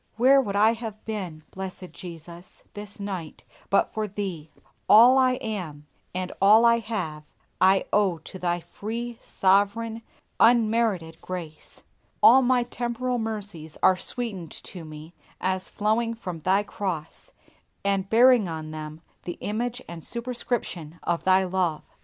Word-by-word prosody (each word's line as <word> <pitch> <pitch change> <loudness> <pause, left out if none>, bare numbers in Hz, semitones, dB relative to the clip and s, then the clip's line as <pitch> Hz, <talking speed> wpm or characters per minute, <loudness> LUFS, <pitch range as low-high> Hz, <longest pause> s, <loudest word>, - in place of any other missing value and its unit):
Where 270 +4 +6
would 200 -6 -4
I 215 +3 +5
have 225 -2 -7
been, 185 -8 -5
Blessed 185 -1 -7
Jesus! 170 0 -10
this 205 0 -8
night, 190 -6 -6 0.3
but 200 - +2
for 215 -1 -2
Thee! 185 -6 -5 0.4
All 245 +5 +8
I 255 -1 +4
am, 180 -12 -5 0.3
and 185 0 -3
all 215 +4 +7
I 235 0 +5
have, 200 -9 -4 0.4
I 190 +1 +5
owe 200 -5 +3
to 175 +4 -11
Thy 175 -1 -1
free, 230 +6 -6
sovereign, 205 +4 +1 0.4
unmerited 220 -8 +3
grace. 170 -4 -8 0.4
All 260 +3 +9
my 250 -1 +3
temporal 245 +1 -2
mercies 205 -8 -5
are 185 - +6
sweetened 195 -4 -5
to 180 -3 -9
me 155 +1 -10 0.3
as 185 0 -1
flowing 225 +2 0
from 180 -7 -6
Thy 190 +5 +2
cross, 180 -6 -5 0.5
and 195 -1 0
bearing 240 -2 +6
on 155 -1 -5
them 155 0 -7 0.2
the 175 - -5
image 240 +4 -3
and 170 -2 -8
superscription 235 -9 -4
of 170 -1 -1
Thy 190 0 +5
love. 180 -4 -1
200 Hz, 140 wpm, -26 LUFS, 175-230 Hz, 0.5 s, All